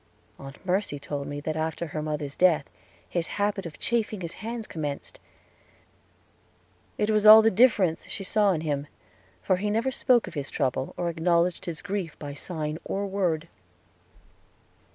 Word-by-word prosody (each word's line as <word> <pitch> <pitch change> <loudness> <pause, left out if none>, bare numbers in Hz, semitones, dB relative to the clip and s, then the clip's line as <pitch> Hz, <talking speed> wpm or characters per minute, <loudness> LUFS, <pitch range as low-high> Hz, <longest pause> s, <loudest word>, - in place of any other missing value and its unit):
Aunt 135 +5 -11
Mercy 185 -4 0
told 140 0 -5
me 145 0 -4
that 155 +1 -3
after 160 +2 -2
her 155 -1 -4
mother's 150 -2 -3
death 175 -5 +3 0.4
his 170 -2 -2
habit 205 -2 0
of 155 - -11
chafing 220 -4 -1
his 170 -1 -5
hands 230 0 -4
commenced; 155 - -5 1.8
it 210 +1 +1
was 215 0 +3
all 220 +1 +11
the 225 - +4
difference 195 -6 +3
she 195 - -5
saw 205 +1 +3
in 165 -4 -1
him, 145 -2 -2 0.6
for 185 - +2
he 210 +3 -1
never 230 +5 +1
spoke 250 -2 +3
of - - -9
his 145 -4 -3
trouble 130 -2 -1
or 175 - -1
acknowledged 170 +1 +1
his 165 -2 -5
grief 195 -5 -3
by 145 -1 -7
sign 155 +1 -4
or 200 +1 -2
word. 180 -5 -1
175 Hz, 160 wpm, -27 LUFS, 155-205 Hz, 1.8 s, all